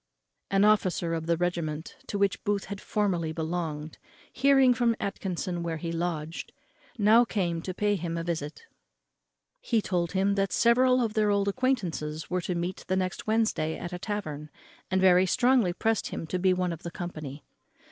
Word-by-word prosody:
An 195 +1 +4
officer 185 -5 +2
of 165 0 -3
the 170 0 +2
regiment 165 -3 -2
to 205 - -3
which 200 -1 +1
Booth 205 -1 0
had 200 0 -7
formerly 180 -6 0
belonged, 160 -2 -4 0.3
hearing 270 -1 +5
from 235 -1 +2
Atkinson 185 -3 -3
where 165 -1 -2
he 165 +1 -4
lodged, 165 -2 -3 0.5
now 220 +2 +6
came 175 -7 -1
to 185 - -4
pay 205 +1 +1
him 170 -2 -3
a 165 - -2
visit. 155 -3 -4 0.9
He 230 - +1
told 175 -4 -1
him 195 +1 +2
that 195 -1 0
several 250 +3 +4
of 220 -2 -2
their 215 -1 +2
old 200 -1 +2
acquaintance 185 - -1
were 180 0 0
to 180 +1 -3
meet 175 +2 -3
the 185 - +1
next 185 +2 -3
Wednesday 215 -8 +1
at 175 0 -6
a 180 - -4
tavern, 155 -8 -4 0.4
and 190 - +1
very 185 0 +5
strongly 245 -3 +3
pressed 220 +4 0
him - - -5
to 180 +3 -2
be 185 +1 +3
one 180 -1 0
of 165 - -9
the 170 - -5
company. 155 -5 -7
185 Hz, 180 wpm, -28 LUFS, 165-210 Hz, 0.9 s, now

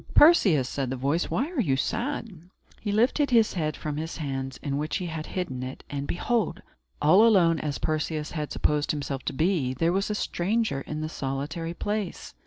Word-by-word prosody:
"Perseus," 195 - +6
said 135 -1 -2
the 130 - -2
voice, 140 +7 0
"why 280 +8 -1
are 310 -8 0
you 140 - +2
sad?" 220 - -3 0.3
He 205 - -2
lifted 250 +7 +3
his 230 -3 +4
head 155 -4 -2
from 150 -1 -4
his 160 +2 -4
hands, 135 -4 -4
in 140 -1 -1
which 155 +1 -1
he 185 - -4
had 160 -2 -5
hidden 150 -9 -3
it, 130 +1 -6
and, 140 0 -3
behold! 220 +2 -1 0.4
all 170 +8 +6
alone 180 -8 +5
as 145 -2 -2
Perseus 155 0 -2
had 150 -3 -4
supposed 150 0 +1
himself 140 -2 -2
to - - -2
be, 155 -4 +1
there 165 +6 +1
was 195 +2 0
a 210 - -1
stranger 205 -6 0
in 155 +2 -5
the 155 - -2
solitary 155 +4 -4
place. 205 -2 -3
160 Hz, 195 wpm, -27 LUFS, 145-205 Hz, 0.4 s, Perseus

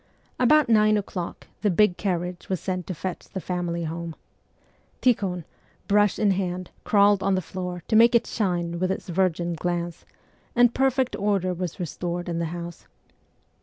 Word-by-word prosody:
About 295 +4 +5
nine 215 -2 +5
o'clock 185 -4 -5 0.2
the 210 - +2
big 190 0 +4
carriage 180 -2 -3
was 185 -2 0
sent 185 -2 -3
to 185 - -4
fetch 185 +3 -5
the 190 - -5
family 175 -2 -2
home. 165 0 -5 0.8
Tikhon, 195 -8 +1 0.4
brush 205 0 +3
in 210 -2 +3
hand, 185 -1 -2
crawled 205 -1 +4
on 195 0 +2
the - - +1
floor, 180 -1 -5
to - - +1
make 235 +2 +7
it 235 - +4
shine 175 -5 -1
with 185 +1 +1
its 190 - -5
virgin 175 -1 +1
glance, 175 0 -3 0.5
and 245 -1 +5
perfect 265 -1 +1
order 195 -3 +1
was 180 -1 -5
restored 175 +1 -3
in 170 -1 -2
the 170 - 0
house. 170 +1 -7
185 Hz, 165 wpm, -25 LUFS, 175-205 Hz, 0.8 s, make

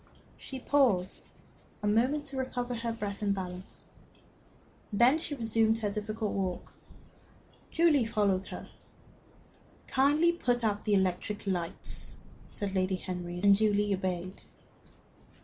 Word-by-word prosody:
She 265 - -8
paused 240 -10 +1 0.5
a - - +1
moment 255 +8 +2
to 275 -2 -5
recover 250 -1 -2 0.2
breath 205 -3 -5
and 200 -1 +1
balance. 185 -1 -6 1.1
Then 240 +9 +5
she 305 -2 -4
resumed 225 -2 +2
her 205 -2 0
difficult 215 +1 -3
walk. 185 -2 -3 1.0
Julie 320 -7 +4
followed 200 -4 +1
her. - - -8 1.2
"Kindly 295 +6 +3
put 245 -8 0
out 210 -2 0
the 210 - +3
electric 190 +2 0
lights," 175 -4 -2 0.3
said 200 -2 -4
Lady 190 0 +1
Henry, 180 -1 -5
and 200 -1 +7
Julie 205 -1 +2
obeyed. 185 0 -3
210 Hz, 115 wpm, -30 LUFS, 190-245 Hz, 1.2 s, and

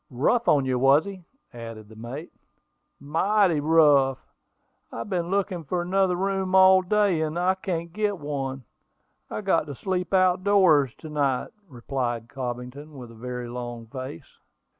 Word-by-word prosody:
"Rough 155 - +1
on 140 -3 +4
you, 130 -1 0
was 135 +4 +5
he?" 190 -3 -9 0.3
added 115 -2 -9
the 110 - -15
mate. 120 +9 -8 0.7
"Mighty 175 +4 +2
rough! 145 -4 +4 0.7
I - - -8
have 115 - -6
been 175 -2 -1
looking 190 -3 -1
for 175 +4 -2
another 185 0 +1
room 190 0 -1
all 190 0 +7
day, 195 -3 +1
and 155 +1 -2
I 180 +2 +2
can't 170 -3 -4
get 210 -1 -1
one. 135 -3 -4 0.7
I've 210 - -5
got 165 -5 +2
to 145 - -6
sleep 180 +4 -3
out 185 -1 +3
doors 180 - +4
to 155 - -8
night," 140 -4 0 0.2
replied 120 -2 -4
Cobbington, 125 +3 -6
with 120 -3 -10
a - - -13
very 125 +1 -6
long 120 -1 -6
face. 130 -9 -9
155 Hz, 160 wpm, -25 LUFS, 130-185 Hz, 0.7 s, all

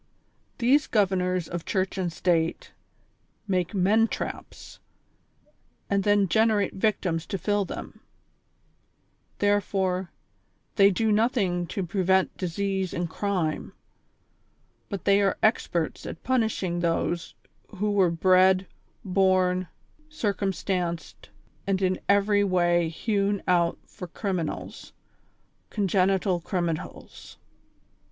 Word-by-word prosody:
These 265 +5 +3
governors 185 -4 +1
of 170 -1 -5
Church 190 -1 -1
and 185 -3 -2
State 165 -1 0 0.8
make 185 0 -1
men 210 +4 +3
traps, - - -7 1.1
and 200 -1 +2
then 205 -1 +3
generate 220 +1 +2
victims 190 -5 -1
to 195 - -3
fill 205 +2 0
them; - - -8 1.4
therefore, 190 -3 0 0.7
they 200 -1 +6
do 220 +3 +1
nothing 205 -6 +1
to 195 -1 -3
prevent 190 +1 +1
disease 190 +1 -2
and 175 0 -1
crime, 175 -3 -2 1.2
but 200 -3 -5
they 200 0 +4
are 195 -1 +1
experts 175 -7 0
at - - -8
punishing 220 -8 0
those 170 0 -1 0.3
who 210 +1 -2
were 195 -3 +3
bred, 185 +2 +4 0.4
born, 185 -1 +2 0.4
circumstanced 195 - -3 0.4
and 195 -1 +1
in 185 -1 0
every 205 0 +4
way 175 -3 +2
hewn 200 +3 -1
out 175 -2 +2
for 180 - -9
criminals, 180 -2 -4 0.8
congenital 190 -2 +1
criminals. 170 -2 -5
190 Hz, 100 wpm, -26 LUFS, 175-205 Hz, 1.4 s, they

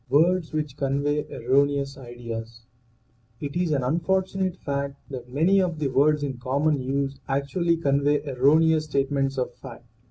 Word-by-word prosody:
WORDS 165 +5 +3
WHICH 150 -3 -3
CONVEY 145 +2 0
ERRONEOUS 140 +2 +1
IDEAS 115 -3 -8 0.7
T - - -5
is 175 -1 0
an 140 -3 +1
unfortunate 185 +5 0
fact 140 -2 -3 0.2
that 125 -2 -7
many 175 +8 +3
of 175 -3 -1
the 150 -3 -1
words 145 +3 +3
in 135 -3 -4
common 140 +3 +1
use 135 +1 -2
actually 165 +5 +1
convey 145 -1 +2
erroneous 155 +4 +3
state 140 -2 0
ments 135 -1 0
of 125 -1 -2
fact. 120 -2 -11
140 Hz, 150 wpm, -25 LUFS, 135-155 Hz, 0.7 s, WORDS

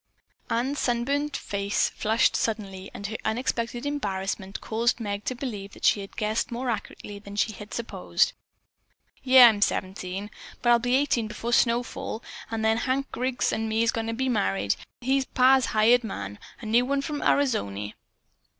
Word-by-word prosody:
Ann's 260 +5 0
sunburned 280 +4 0
face 200 0 0
flushed 220 +2 +2
suddenly 195 -4 -2
and 200 - -8
her 220 +2 -3
unexpected 240 +1 -2
embarrassment 195 -8 -3
caused 235 +3 0
Meg 205 -2 -4
to 255 - -2
believe 210 -6 -6
that - - -6
she 205 - +4
had 195 - -11
guessed 215 +2 -1
more 245 +1 -2
accurately 205 -2 -6
than 200 0 -10
she 210 +1 +1
had 210 0 -10
supposed. 90 - 0 0.9
"Yeah, 260 -2 +9
I'm 210 -3 +2
seventeen. 190 +1 -2 0.3
But 240 - +4
I'll 235 - +6
be 245 +2 +1
eighteen 260 -5 +1
before 230 +2 -4
snowfall, 235 -1 0 0.3
an' 225 -1 -3
then 220 0 +3
Hank 265 +3 -1
Griggs 255 +1 -1
an' 220 0 -1
me's 225 +1 +2
goin' 225 -1 -3
to 230 - -2
be 260 +3 -1
married. 100 - +1 0.3
He's 265 +2 +1
pa's 260 0 +4
hired 230 +3 +4
man. 100 - -6 0.2
A - - -8
new 230 +3 +3
one 275 +2 0
from 295 0 -3
Arizony." 105 - 0
225 Hz, 165 wpm, -26 LUFS, 205-250 Hz, 0.9 s, Yeah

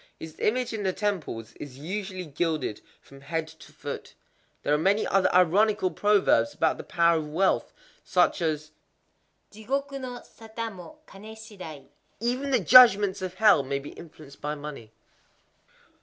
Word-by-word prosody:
His 160 -1 -9
image 245 +2 0
in 220 - -3
the 190 -2 -1
temples 160 - -3
is 135 -3 -9
usually 185 +4 -5
gilded 150 -6 -2 0.2
from 135 0 -16
head 160 +2 -3
to 160 -1 -15
foot.—There 145 - -7
are - - +4
many 195 +6 +2
other 195 -1 +2
ironical 185 +2 +3
proverbs 200 - +2
about 160 -1 +1
the - - -6
power 170 -1 +2
of 150 -1 -6
wealth,—such 185 +2 0
as 155 -2 -2 0.8
Jigoku 275 +6 -4
no 250 -2 -7
sata 225 0 -7
mo 190 - -12
kané 215 +1 -12
shidai: 185 - -10 0.3
"Even 250 +5 -2
the 260 -3 +3
Judgments 205 -1 +7
of 185 -1 -5
Hell 210 -6 +5
may 140 +1 -3
be 140 +1 -8
influenced 155 -4 -14
by 150 +1 -3
money." 145 -7 -9
185 Hz, 145 wpm, -26 LUFS, 155-215 Hz, 0.8 s, Judgments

